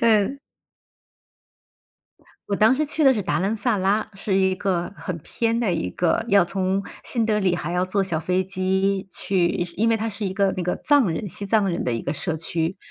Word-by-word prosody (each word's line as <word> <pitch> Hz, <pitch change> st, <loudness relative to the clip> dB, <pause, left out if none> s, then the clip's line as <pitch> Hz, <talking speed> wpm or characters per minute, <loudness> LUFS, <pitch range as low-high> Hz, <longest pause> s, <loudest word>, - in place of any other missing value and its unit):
嗯。 225 Hz, +4 st, +3 dB, 2.1 s
我 200 Hz, -, 0 dB
当 220 Hz, +4 st, +5 dB
时 305 Hz, -, 0 dB
去 305 Hz, +1 st, 0 dB
的 265 Hz, -1 st, +6 dB
是 210 Hz, -, -2 dB
达 185 Hz, -, 0 dB
兰 195 Hz, +4 st, 0 dB
萨 225 Hz, +1 st, +2 dB
拉， 200 Hz, +3 st, 0 dB
是 195 Hz, 0 st, -1 dB
一 190 Hz, -1 st, +2 dB
个 185 Hz, -2 st, -2 dB
很 180 Hz, -4 st, -5 dB
偏 230 Hz, +8 st, -1 dB
的 215 Hz, -6 st, +1 dB
一 160 Hz, -, -1 dB
个 175 Hz, -, 0 dB
要 200 Hz, -4 st, +5 dB
从 190 Hz, +2 st, -1 dB, 0.2 s
新 230 Hz, -3 st, -1 dB
德 215 Hz, -1 st, +1 dB
里 190 Hz, -3 st, +2 dB
还 175 Hz, -1 st, -4 dB
要 180 Hz, +1 st, +1 dB
坐 195 Hz, +2 st, 0 dB
小 170 Hz, -5 st, -1 dB
飞 185 Hz, +3 st, 0 dB
机 190 Hz, +1 st, 0 dB
去 185 Hz, -1 st, +1 dB, 0.3 s
因 225 Hz, +3 st, +2 dB
为 225 Hz, -, +3 dB
它 225 Hz, +1 st, -2 dB
是 210 Hz, -1 st, -3 dB
一 190 Hz, -, -4 dB
个 200 Hz, -2 st, +2 dB
那 180 Hz, -, -2 dB
个 180 Hz, -, -1 dB
藏 290 Hz, -7 st, +3 dB
人 170 Hz, +5 st, -3 dB
西 200 Hz, +3 st, -2 dB
藏 205 Hz, -1 st, +2 dB
人 175 Hz, -, -2 dB
的 125 Hz, -, 0 dB
一 115 Hz, -, -2 dB
个 140 Hz, -, -2 dB
社 160 Hz, +1 st, -2 dB
区。 165 Hz, +2 st, -2 dB
195 Hz, 230 characters per minute, -23 LUFS, 180-215 Hz, 2.1 s, 的